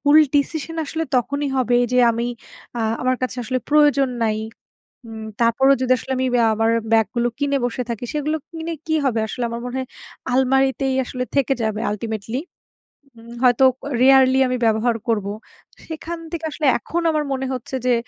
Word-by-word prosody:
ভুল 295 Hz, +1 st, +5 dB, 0.2 s
ডিসিশন 315 Hz, +3 st, -1 dB
আসলে 325 Hz, +3 st, -3 dB
তখনই 285 Hz, +4 st, -1 dB
হবে 245 Hz, -1 st, +2 dB, 0.2 s
যে 250 Hz, -, +3 dB
আমি 235 Hz, +1 st, -2 dB, 0.5 s
আ -, -, -1 dB, 0.2 s
আমার 255 Hz, 0 st, +1 dB
কাছে 255 Hz, 0 st, -2 dB
আসলে 255 Hz, +3 st, -1 dB
প্রয়োজন 290 Hz, -2 st, +4 dB, 0.2 s
নাই। 215 Hz, -1 st, 0 dB, 0.7 s
উম 220 Hz, -1 st, -8 dB, 0.2 s
তারপরেও 265 Hz, +4 st, +4 dB
যদি 255 Hz, 0 st, +2 dB
আসলে 265 Hz, -, -5 dB
আমি 260 Hz, 0 st, 0 dB
অ্যা 235 Hz, -, +4 dB
আমার 225 Hz, +1 st, +1 dB, 0.2 s
ব্যাগ 225 Hz, -2 st, +5 dB
গুলো 240 Hz, 0 st, +1 dB
কিনে 280 Hz, -1 st, +1 dB
বসে 245 Hz, +1 st, -2 dB
থাকি 235 Hz, 0 st, -4 dB
সেগুলো 300 Hz, +1 st, -1 dB
কিনে 330 Hz, 0 st, -5 dB
কি 315 Hz, -, 0 dB
হবে? 235 Hz, -5 st, +1 dB
আসলে 245 Hz, -, -3 dB
আমার 235 Hz, 0 st, -5 dB
মনে 250 Hz, +1 st, -5 dB
হয় 260 Hz, -, -4 dB, 0.4 s
আলমারিতেই 265 Hz, +1 st, +2 dB
আসলে 250 Hz, 0 st, -4 dB
থেকে 275 Hz, -1 st, +2 dB
যাবে 220 Hz, 0 st, -1 dB
ultimately 220 Hz, +3 st, -4 dB, 0.8 s
উম 230 Hz, +1 st, -12 dB
হয়তো 250 Hz, +1 st, +4 dB, 0.2 s
ক -, -, -71 dB, 0.2 s
rarely 265 Hz, 0 st, +6 dB
আমি 250 Hz, 0 st, -1 dB
ব্যবহার 225 Hz, +2 st, +2 dB
করবো। 210 Hz, -3 st, 0 dB, 0.5 s
সেখান 330 Hz, +1 st, -6 dB
থেকে 330 Hz, -1 st, -4 dB
আসলে 300 Hz, 0 st, -3 dB
এখন 345 Hz, -, -3 dB
আমার 305 Hz, -1 st, 0 dB
মনে 265 Hz, 0 st, -2 dB
হচ্ছে 255 Hz, +1 st, -5 dB
যে 250 Hz, -, +4 dB
255 Hz, 175 wpm, -21 LUFS, 235-280 Hz, 0.8 s, rarely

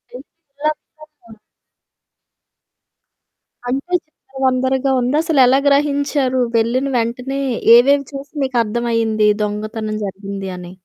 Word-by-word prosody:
ఏం 255 Hz, -, -8 dB
చేయాలో 300 Hz, -2 st, -8 dB, 0.4 s
అర్ధమవ్వదు. 230 Hz, -8 st, -19 dB, 2.3 s
అంటే 275 Hz, +8 st, -3 dB
చిందరవందరగా 265 Hz, -2 st, -1 dB
ఉందా? 255 Hz, +5 st, 0 dB
అసలెలా 270 Hz, -4 st, +4 dB
గ్రహించారు? 280 Hz, -2 st, +1 dB, 0.2 s
వెళ్ళిన 245 Hz, +4 st, +1 dB
వెంటనే 250 Hz, +4 st, -2 dB, 0.4 s
ఏవేవి 280 Hz, +4 st, +5 dB
చూసి 275 Hz, +2 st, -8 dB
మీకర్థమయింది 230 Hz, -3 st, 0 dB
దొంగతనం 215 Hz, +1 st, -4 dB
జరిగింది 195 Hz, 0 st, -6 dB
అని? 180 Hz, 0 st, -10 dB
255 Hz, 90 wpm, -18 LUFS, 225-275 Hz, 2.3 s, ఏవేవి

